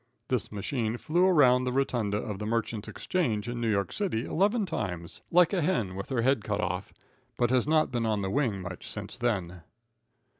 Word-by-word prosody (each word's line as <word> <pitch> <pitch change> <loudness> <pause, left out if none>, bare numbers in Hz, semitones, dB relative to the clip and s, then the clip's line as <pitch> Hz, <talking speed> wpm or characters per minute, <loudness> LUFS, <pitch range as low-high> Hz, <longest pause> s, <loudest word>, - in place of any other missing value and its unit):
This 125 -4 -1
machine 110 +2 -2
flew 175 +8 +2
around 130 -8 +5
the 125 - -1
rotunda 120 -6 0
of 105 -2 -4
the 105 - -3
Merchants' 115 -1 -2
Exchange, 115 - -1
in 120 0 -3
New 115 - +1
York 100 -2 0
City, 170 - -1
eleven 205 +4 +2
times, 95 - -4
like 175 +2 +5
a 185 - +2
hen 135 - 0
with 100 - -6
her 125 -4 0
head 130 -4 +2
cut 105 -1 -2
off, 90 -1 -2 0.5
but 120 -1 +2
has 130 +1 +2
not 155 -2 +3
been 120 -2 0
on 105 -2 0
the 95 - -2
wing 115 -9 0
much 90 -1 -7
since - - -7
then. 90 -7 -1
115 Hz, 195 wpm, -29 LUFS, 105-140 Hz, 0.5 s, around